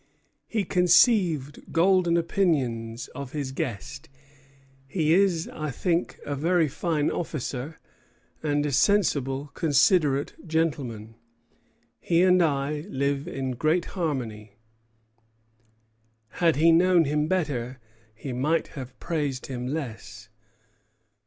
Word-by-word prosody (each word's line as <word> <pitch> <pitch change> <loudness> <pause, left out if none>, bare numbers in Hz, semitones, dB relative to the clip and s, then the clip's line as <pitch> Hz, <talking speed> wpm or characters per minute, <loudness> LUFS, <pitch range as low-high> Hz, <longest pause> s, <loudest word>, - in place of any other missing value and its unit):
He 220 -3 -1
conceived 180 - +3
golden 175 0 +3
opinions 125 -11 -1
of 140 0 -8
his 145 -3 -3
guest. 135 +5 -5 0.8
"He 155 +1 +1
is, 180 -3 +2
I 155 -1 -5
think, 170 +5 -1
a 145 - -3
very 165 +3 +2
fine 150 +1 -1
officer, 150 -2 -4 0.6
and 145 -1 0
a 145 - -1
sensible, 140 -5 +1
considerate 145 -2 +2
gentleman. 135 -9 -2 0.9
He 170 0 +2
and 185 -1 +5
I 150 -1 0
live 140 0 -1
in 135 -6 -3
great 155 +7 +1
harmony." 120 - -3 1.8
Had 165 +6 +1
he 165 +4 +5
known 175 0 +4
him 150 +1 0
better, 135 -8 -2 0.4
he 130 +3 -6
might 150 +7 0
have 130 -3 -9
praised 145 -6 -2
him 125 -2 -5
less. 120 -6 -6
150 Hz, 105 wpm, -26 LUFS, 135-170 Hz, 1.8 s, and